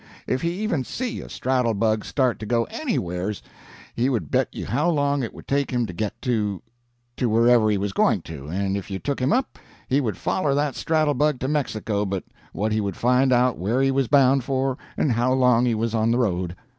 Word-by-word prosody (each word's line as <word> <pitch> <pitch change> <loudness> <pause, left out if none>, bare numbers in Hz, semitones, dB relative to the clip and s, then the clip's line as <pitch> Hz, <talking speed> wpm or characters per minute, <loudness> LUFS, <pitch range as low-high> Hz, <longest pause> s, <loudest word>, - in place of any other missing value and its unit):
If 130 - -1
he 170 - 0
even 190 - -1
see 250 - -4
a - - -10
straddle 125 -3 0
bug 110 +1 +1
start 130 -4 0
to 110 - -6
go 115 0 +2
anywheres, 100 - -3 0.5
he 125 +3 +1
would 110 - -2
bet - - +2
you - - -6
how 150 +7 +1
long 145 -3 +1
it 115 - -3
would - - -13
take 140 0 0
him 120 -2 0
to 90 - -7
get 105 +4 -4
to 105 -7 -1 0.5
to 125 - +1
wherever 115 0 +4
he 105 - +2
was 100 0 -2
going 95 -3 +2
to, 75 -3 -9
and 95 +4 -1
if 100 -1 -5
you 95 - -3
took 140 +8 -3
him 130 +3 +2
up, 260 +1 0 0.3
he 135 +3 +2
would 115 -6 -2
foller 145 -7 0
that 145 -1 0
straddle 155 -2 +1
bug 145 0 +1
to 130 - -1
Mexico 110 -8 -1
but 95 -2 -3 0.3
what 110 +2 -2
he 110 0 +1
would 100 -3 -3
find 125 +2 +3
out 125 0 +3
where 110 +8 0
he 135 0 +3
was 135 -1 +1
bound 135 -1 +4
for 135 0 0 0.2
and 145 - +2
how 120 +2 +2
long 125 -2 +4
he 115 - +1
was 115 +1 -1
on 110 0 +2
the 120 - +2
road. 90 -7 -1
120 Hz, 225 wpm, -23 LUFS, 105-135 Hz, 0.5 s, wherever